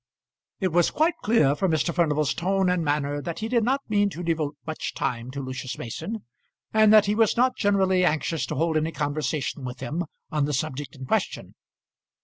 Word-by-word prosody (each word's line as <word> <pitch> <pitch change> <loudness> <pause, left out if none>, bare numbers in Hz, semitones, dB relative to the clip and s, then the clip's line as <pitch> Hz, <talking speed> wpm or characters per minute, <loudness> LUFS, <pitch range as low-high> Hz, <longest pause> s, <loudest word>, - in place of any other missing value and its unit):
It 190 - +1
was 175 0 +3
quite 320 +3 +2
clear 180 -11 +3
from 185 +6 0
Mr. 165 +1 +1
Furnival's 155 -4 +1
tone 190 +1 +1
and 180 -2 0
manner 145 -1 0
that 170 +2 -5
he 220 - -3
did 235 -1 +2
not 265 +4 +1
mean 205 -1 +2
to 175 -2 -7
devote 160 -3 -1
much 160 -1 -4
time 120 0 -2
to 140 +2 -5
Lucius 130 -1 -5
Mason, 205 - -5 0.5
and 215 -1 +6
that 215 -1 +7
he 205 - +1
was 225 0 +2
not 255 +2 +3
generally 190 -3 +2
anxious 160 -1 0
to 155 - -3
hold 160 +2 +1
any 160 +1 -1
conversation 150 -1 -2
with 125 -1 -6
him 150 +7 -3 0.3
on 150 -2 +1
the 150 - -2
subject 140 -1 -3
in 130 -1 -8
question. - - -2
165 Hz, 195 wpm, -25 LUFS, 145-200 Hz, 0.5 s, that